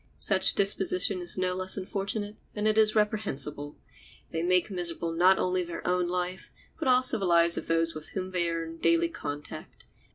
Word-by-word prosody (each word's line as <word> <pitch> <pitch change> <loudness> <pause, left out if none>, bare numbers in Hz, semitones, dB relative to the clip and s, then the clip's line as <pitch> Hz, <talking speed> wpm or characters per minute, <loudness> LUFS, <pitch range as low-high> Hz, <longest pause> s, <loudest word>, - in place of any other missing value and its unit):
Such - - +3
disposition 195 -1 +2
is 175 +1 -1
no 185 0 0
less 185 +1 -2
unfortunate 200 +2 -4 0.2
than 210 0 -2
it 215 0 +2
is 215 0 +3
reprehensible. 150 -9 -1 0.5
They 165 - -2
make 180 +3 +1
miserable 170 -2 -1
not 180 +3 +4
only 185 0 0
their 170 -1 -8
own 180 0 +1
life, 180 +1 -4 0.3
but 315 - -2
also 255 -2 +4
the 195 - -2
lives 170 -1 +4
of - - -5
those 165 0 +1
with 155 0 -9
whom 185 -1 -4
they 175 -2 0
are 165 0 -3
in 165 0 -9
daily 165 0 +2
contact. 145 -2 -8
180 Hz, 185 wpm, -28 LUFS, 165-195 Hz, 0.5 s, not